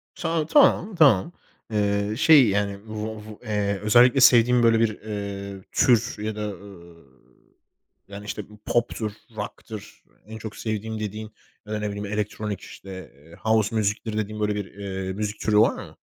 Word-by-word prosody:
Şa 165 -2 -1
tamam, 220 - +4
tamam. 145 - +5 0.4
Eee, 100 0 0
şey, 145 -5 +7
yani, 100 0 0
vu 110 0 -5
va - - -9 0.2
eee, 100 -2 -1
özellikle 120 +5 +5
sevdiğin 120 0 +6
böyle 115 -1 +5
bir, 115 -1 +3
eee, 100 -2 -6
tür 120 -1 +3
ya 110 0 -3
da, 105 0 -3
eee, 85 -5 -11 1.0
yani, 100 +1 -9
işte, 105 0 -6
bir 105 - -15
pop'tur, 120 -2 -1 0.3
rock'tır - - -8 0.2
en 110 0 -8
çok 110 -1 -8
sevdiğim 110 0 -4
dediğin. 110 +1 -5 0.3
Ya 105 - -6
da 105 - -1
ne 105 - -2
bileyim 100 0 -5
elektronik 105 -1 -3
işte, 95 - -12 0.3
eee, 80 +4 -17
house 110 0 +1
music'tir 110 +1 -1
dediğin 105 0 -3
böyle, 105 0 0
eee, 95 -1 -5
bir - - -3
müzik 105 +1 -4
türü 105 -1 +1
var - - +4
mı? - - -16
105 Hz, 165 wpm, -24 LUFS, 100-110 Hz, 1.0 s, şey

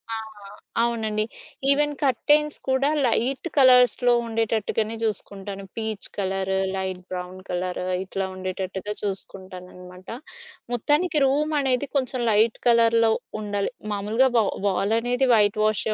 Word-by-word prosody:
ఆ! - - -3 0.3
ఆ! - - -12 0.4
అవునండి. 220 -2 0 0.5
ఈవెన్ 295 +1 +3
కర్టైన్స్ 295 +3 +2
కూడా 265 +2 +2 0.2
లైట్ 255 +6 0
కలర్స్‌లో 250 -2 +5
ఉండేటట్టుగానే 225 -1 -1
చూసుకుంటాను. 200 -2 -4
Peach 220 -2 -3
colour, 190 -1 -1 0.2
light 190 -1 -3
brown 180 0 -6
colour 180 0 -3 0.2
ఇట్లా 195 0 -3
ఉండేటట్టుగా 185 +2 -4
చూసుకుంటాననమాట. 185 -2 -7 0.7
మొత్తానికి 300 +7 +1
రూమ్ 295 +3 +1
అనేది 265 0 0
కొంచెం 260 -2 0
లైట్ 215 +2 +3
కలర్‌లో 230 -1 +4 0.3
ఉండాలి. 205 -1 -2 0.2
మామూలుగా 215 +6 +2
వా 225 - +5 0.2
వాలనేది 230 +7 +1
వైట్ 210 0 +2
వాషే 215 0 +1
220 Hz, 115 wpm, -24 LUFS, 195-250 Hz, 0.7 s, కలర్స్‌లో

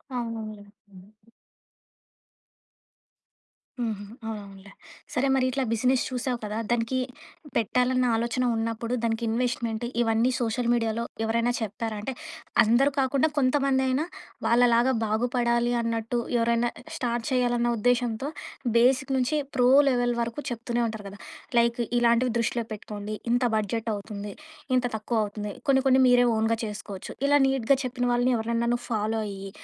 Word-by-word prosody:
అవునవునులే. 220 -3 -5 0.2
హ్మ్. 195 +2 -16 2.7
హుహు. 215 -3 -2 0.2
అవునవునులే. 200 -3 -8 0.4
సరే 265 +2 +1
మరిట్లా 260 +1 +1
బిజినెస్ 250 +3 +2
చూసావు 250 0 -2
కదా! 210 0 -3
దానికి 240 +2 0 0.6
పెట్టాలన్న 250 +3 +2
ఆలోచన 235 +2 0
ఉన్నప్పుడు, 230 +1 -2
దానికి 225 0 0
ఇన్వెస్ట్‌మెంట్ 235 -1 -1 0.2
ఇవన్నీ 230 +2 +2
సోషల్ 235 0 -1
మీడియాలో 230 -1 0 0.2
ఎవరైనా 230 +2 +1
చెప్పారా? 220 +1 -3
అంటే 260 +5 -4 0.5
అందరూ 245 +6 +4
కాకుండా 270 +3 +2
కొంతమందైనా 265 0 +2 0.4
వాళ్ళలాగా 240 +1 +4
బాగుపడాలి 235 +2 +1
అన్నట్టు, 230 +1 -2 0.2
ఎవరైనా 235 +1 +2 0.3
స్టార్ట్ 240 -2 -2
చేయాలన్న 240 -1 +2
ఉద్దేశ్యంతో 245 +2 +1 0.5
బేసిక్ 265 +3 +3
నుంచి 260 +4 +1 0.2
ప్రో 245 -1 +4 0.2
లెవెల్ 245 -2 +1
వరకు 235 +5 -3
చెప్తూనే 240 0 -2
ఉంటారు 220 -2 -6
కదా! 200 +1 -12 0.4
లైక్ 235 +1 +2 0.2
ఇలాంటివి 235 0 +3
దృష్టిలో 235 0 0
పెట్టుకోండి, 210 0 -6 0.2
ఇంత 245 +1 +2
బడ్జెట్ 220 +2 -1
అవుతుంది, 205 0 -7 0.4
ఇంత 250 - +2
తక్కువౌతుంది 210 -2 -2 0.2
కొన్ని 265 0 +4
కొన్ని 260 0 +5
మీరే 245 0 +5
ఓన్‌గా 225 +1 +1
చేసుకోవచ్చు. 205 -2 -7 0.2
ఇలా 290 0 +5
నీట్‌గా 270 0 +2
చెప్పిన 250 0 -3
వాళ్ళని 245 +1 +2
ఎవరినైనా 230 +1 -1
నువ్వు 240 - -4
ఫాలో 220 +1 0
అయ్యి, 195 0 -7
235 Hz, 125 wpm, -26 LUFS, 220-250 Hz, 2.7 s, కొన్ని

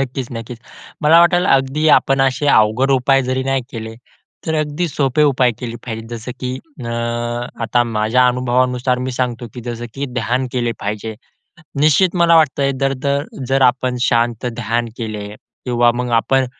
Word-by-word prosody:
नक्कीच 130 -1 -3
नक्कीच. 115 +1 -7 0.4
मला 160 +3 +6
वाटलं, 175 +1 +3
अगदी 135 +3 +2
आपण 135 0 0
असे 135 +2 +1
अवघड 110 +5 +3
उपाय 135 +1 +3
जरी 130 +1 -1
नाही 135 -1 0
केले 110 -2 -6 0.5
तर 160 - 0
अगदी 155 +3 -1
सोपे 140 0 +1
उपाय 130 -4 +3
केले 120 -1 -5
पाहिजे. 115 -1 -5
जसं 120 +2 -7
की 125 0 -3 0.3
अ, 115 - -4 0.7
आता 120 +2 +2
माझ्या 115 +3 +2
अनुभवानुसार 125 0 0
मी - - -2
सांगतो, 120 -1 -2
की 120 - -7
जसं 120 0 -6
की 140 +1 -3
ध्यान 125 +4 -1
केले 120 -2 -1
पाहिजे. 105 +2 -4 0.7
निश्चित 155 +5 +3
मला 170 -1 +5
वाटतं, 140 -3 +2
दर-दर 140 +1 0 0.2
जर 135 0 +2
आपण 125 0 +2
शांत 120 -1 +1
ध्यान 115 +1 -1
केले 105 -3 -5 0.4
किंवा 120 -1 +3
मग 125 0 -3
आपण 135 +3 +1
125 Hz, 160 wpm, -18 LUFS, 120-135 Hz, 0.7 s, मला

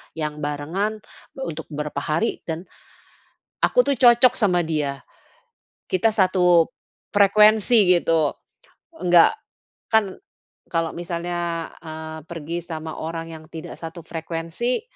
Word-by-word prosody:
yang 150 -1 -4
barengan 165 +9 -3 0.3
untuk 165 - -5
beberapa 150 -1 -4
hari 155 +10 -1
dan 165 +1 -4 1.0
aku - - +4
tuh - - -1
cocok 245 0 +7
sama 180 -8 +1
dia, 150 -4 -2 0.8
kita 205 +5 +2
satu 180 -4 +4 0.5
frekuensi 205 -2 +5
gitu. 160 -3 +2 0.7
Enggak, 175 -2 +6 0.6
kan 210 -4 +2 0.6
kalau 165 -1 -1
misalnya, 170 -1 -3 0.2
eee, 160 0 -7
pergi 170 0 -6
sama 160 -2 -6
orang 165 +1 -5
yang 160 -1 -10
tidak 165 +1 -8
satu 165 +1 -8
frekuensi, 165 +8 -3
170 Hz, 110 wpm, -23 LUFS, 160-195 Hz, 1.0 s, cocok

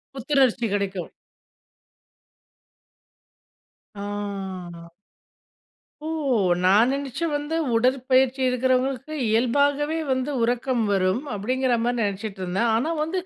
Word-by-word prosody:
புத்துணர்ச்சி 265 -3 +2
கெடைக்கும் 195 -3 -3 2.8
ஆ. 195 -4 -6 1.2
"ஓ! - - -2 0.6
நான் 210 +6 +5
நெனச்சு 275 +3 -3
வந்தேன், 300 +3 -1
உடற்பயிற்சி 255 +2 +2
இருக்கிறவங்களுக்கு, 260 +2 0 0.2
இயல்பாகவே 285 +7 +2
வந்து 260 +2 -1
உறக்கம்" 245 0 0
வரும். 190 +2 +2
அப்டிங்கிற 250 +5 0
மாதிரி 245 0 0
நெனைச்சிட்டு 200 0 -4
இருந்தேன். 190 +6 0
ஆனா 265 +9 0
வந்து 340 +4 -2
245 Hz, 85 wpm, -24 LUFS, 205-270 Hz, 2.8 s, நான்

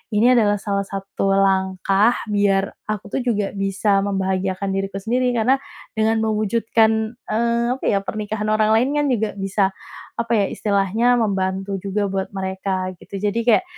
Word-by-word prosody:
"Ini 235 +4 +5
adalah 210 -4 +3
salah 200 -1 -1
satu 195 0 -3
langkah 195 +3 +2 0.2
biar 200 -1 +2 0.2
aku 210 -2 -3
tuh 265 - 0
juga 210 -5 -1
bisa 195 0 +1
membahagiakan 190 0 -1
diriku 195 0 -3
sendiri, 250 +4 +1
karena 260 +4 +3 0.4
dengan 220 +1 +2
mewujudkan, 220 +1 +1 0.2
eee, 235 +1 +1
apa - - -14
ya 200 - +2
pernikahan 215 +1 -4
orang 215 0 +3
lain 240 +5 +3
kan 295 - +2
juga 220 -3 0
bisa 195 0 +1 0.5
apa 235 0 -3
ya, 205 -3 +3
istilahnya 215 +4 +1
membantu 195 -1 -1
juga 200 +1 -1
buat 190 0 -2
mereka," 190 -1 -3
gitu. 195 +2 -8
Jadi 210 +2 0
kayak 245 +10 +4
205 Hz, 150 wpm, -21 LUFS, 195-220 Hz, 0.5 s, Ini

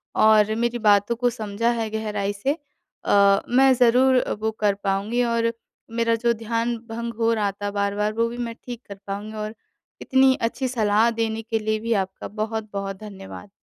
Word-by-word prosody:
और 215 0 +5
मेरी 235 +1 -1
बातों 205 +1 +4
को 245 +1 +1
समझा 220 0 -2
है 220 -1 -2
गहराई 210 -2 -2
से 235 +8 -1 0.5
अ, 200 -1 +5
मैं 265 +2 +5
ज़रूर 250 +1 +4 0.2
वो 220 +1 -1
कर 205 -1 +3
पाऊँगी 205 +5 0
और 230 -1 +1 0.4
मेरा 230 0 +2
जो 235 +1 +1
ध्यान 230 +1 -1
भंग 235 +1 -4
हो 230 0 +3
रहा 210 -3 0
था 205 +1 -5
बार-बार 205 +1 -1
वो 230 +1 +1
भी 240 - -7
मैं 235 -1 -4
ठीक 245 -2 -7
कर 200 - -8
पाऊँगी। 205 +2 -5
और 215 +1 -5 0.5
इतनी 265 0 +4
अच्छी 245 +3 -1
सलाह 220 -2 +2
देने 225 -1 -2
के 225 0 -2
लिए 215 0 -1
भी 230 +1 -1
आपका 190 0 -9
बहुत-बहुत 210 -2 -4
धन्यवाद। 200 -1 -10
220 Hz, 175 wpm, -23 LUFS, 205-235 Hz, 0.5 s, और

